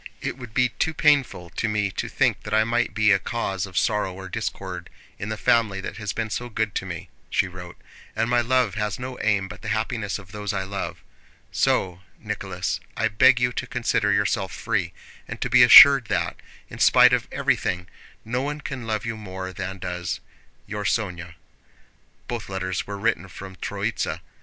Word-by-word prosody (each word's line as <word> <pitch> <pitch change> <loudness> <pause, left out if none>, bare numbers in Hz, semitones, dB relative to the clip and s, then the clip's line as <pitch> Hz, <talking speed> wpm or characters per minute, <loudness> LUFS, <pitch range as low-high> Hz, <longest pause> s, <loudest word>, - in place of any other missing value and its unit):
It - - -3
would 120 -4 -10
be 125 -1 +3
too 160 +5 -2
painful 140 - +2
to 115 - -2
me 105 -2 0
to - - -4
think - - +1
that 105 0 -2
I 110 - +5
might 120 +2 0
be 105 -1 +4
a 95 - +4
cause 100 -5 -3
of 95 - -8
sorrow 105 -4 +1
or 95 +1 -8
discord 95 -5 -5 0.3
in 105 - -4
the 110 - -3
family 110 -4 +2
that 95 - -6
has 105 -3 -3
been 110 +1 -3
so 120 +3 -3
good 110 -2 -1
to 95 - -3
me 85 -3 -7 0.2
(she 100 - +1
wrote), 90 -1 -10 0.4
and 115 - +1
my 120 0 +3
love 125 -3 +2
has 105 -1 -2
no 125 0 -6
aim 100 -2 +1
but - - -11
the 110 - -8
happiness 110 -1 -1
of 95 -2 -14
those 105 0 -4
I 95 -1 -1
love; 100 +1 -5 0.5
so, 90 -1 +1 0.2
Nicholas, - - -3 0.2
I - - +1
beg 125 +3 +5
you 125 0 +1
to 125 - -4
consider 120 -4 0
yourself 100 -1 +1
free, 100 -6 -2 0.4
and - - -7
to - - -3
be 125 0 +7
assured 135 +1 +10
that, - - -1 0.3
in - - -10
spite - - +6
of - - +1
everything, 90 -1 0 0.4
no 120 +3 -1
one 145 +2 -3
can 130 -5 -6
love 110 -1 -2
you 115 -1 -3
more 95 -3 -7
than 95 0 -5
does 90 -1 -4 0.5
Your 105 0 -5
Sónya 90 -5 -2 0.9
Both 120 -4 -5
letters 95 -1 -3
were 100 0 -5
written 100 -3 0
from 95 +1 -10
Tróitsa. - - -3
105 Hz, 190 wpm, -24 LUFS, 95-115 Hz, 0.9 s, assured